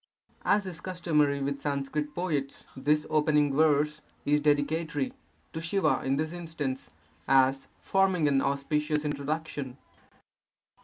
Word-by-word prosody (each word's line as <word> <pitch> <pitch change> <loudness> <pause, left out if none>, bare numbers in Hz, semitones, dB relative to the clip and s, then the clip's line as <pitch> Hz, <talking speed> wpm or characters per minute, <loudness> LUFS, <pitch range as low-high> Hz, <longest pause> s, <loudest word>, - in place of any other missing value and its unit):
As 205 -1 +3
is 180 -2 -7
customary 155 -6 +1
with 140 0 -2
Sanskrit 145 +1 -2
poets, 150 -6 -2
this 150 +3 +1
opening 150 -2 +2
verse 150 0 +3 0.2
is 150 +1 +3
dedicatory 145 0 0 0.4
(to 160 - -4
Siva 190 +4 +1
in 135 +1 +1
this 155 +3 -2
instance), 160 -6 -4 0.4
as 135 0 +4
forming 190 -5 +2
an 135 -1 +3
auspicious 150 +2 0
introduction. 145 -2 -3
150 Hz, 115 wpm, -29 LUFS, 140-160 Hz, 0.4 s, as